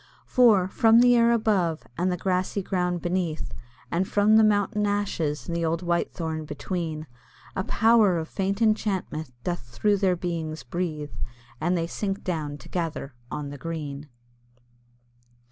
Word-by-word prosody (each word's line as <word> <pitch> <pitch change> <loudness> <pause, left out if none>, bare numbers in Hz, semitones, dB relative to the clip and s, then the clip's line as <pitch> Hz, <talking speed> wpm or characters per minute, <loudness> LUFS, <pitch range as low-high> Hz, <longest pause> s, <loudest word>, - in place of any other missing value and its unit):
For, 220 -7 +5
from 225 +4 +5
the 245 0 +6
air 235 0 +5
above, 195 -8 +1
and 180 +2 0
the 180 - -1
grassy 185 +2 -1
ground 180 -2 -1
beneath, 175 -3 -2 0.4
And 185 +3 +1
from 210 +1 +4
the 220 - +7
mountain 210 0 +2
ashes 190 -7 -1
and 170 - -2
the 170 - -1
old 165 +1 0
Whitethorn 165 -2 -1
between, 155 +1 -4 0.5
A 190 - 0
Power 220 -4 +4
of 160 -1 -3
faint 195 +5 -1
enchantment 195 - 0
doth 175 -1 -1
through 200 - 0
their 190 -2 +2
beings 165 -5 -4
breathe, 155 +1 -3 0.5
And 175 +2 +1
they 165 - 0
sink 195 +3 -3
down 155 -5 -3
together 155 -1 -4 0.2
on 150 -1 -5
the 145 - -8
green. 150 -2 -5
180 Hz, 145 wpm, -26 LUFS, 160-205 Hz, 0.5 s, the